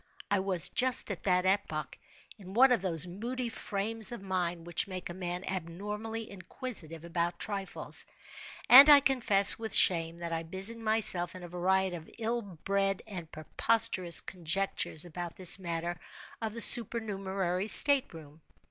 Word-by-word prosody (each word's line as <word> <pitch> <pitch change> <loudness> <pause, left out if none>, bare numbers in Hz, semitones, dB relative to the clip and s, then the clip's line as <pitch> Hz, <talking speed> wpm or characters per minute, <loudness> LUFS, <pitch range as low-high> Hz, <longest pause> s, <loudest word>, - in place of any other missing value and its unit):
I 200 - +1
was, 185 -3 -1
just 255 -3 +1
at 190 - -8
that 180 -1 0
epoch, 190 -6 -3 0.4
in 190 0 -13
one 260 +2 +4
of 240 - 0
those 170 -5 +3
moody 235 +7 -7
frames 220 +1 -4
of 240 - -8
mind 180 -3 -5
which 175 +2 -3
make 185 -2 -8
a - - -9
man 180 0 -7
abnormally 210 +5 -7
inquisitive 185 - -8
about 170 0 -4
trifles: 195 0 -5 0.6
and 275 +4 +8
I 290 -1 +8
confess, 235 -9 +4
with 220 -2 -1
shame, 165 -2 +3
that 170 -1 -7
I 165 - -4
busied 190 +7 -6
myself 215 -6 -1
in 185 - -12
a - - -9
variety 185 +1 -2
of 160 - -15
ill 235 +1 -4
bred 195 0 -4
and 175 -7 -10
preposterous 180 +1 -2
conjectures 180 -2 -4
about 175 0 -9
this 185 -1 +6
matter 170 -1 -6 0.4
of 220 -1 -6
the 230 - -6
supernumerary 195 -5 +5
state 280 +3 +6
room. 155 -1 -15
190 Hz, 155 wpm, -28 LUFS, 175-220 Hz, 0.6 s, and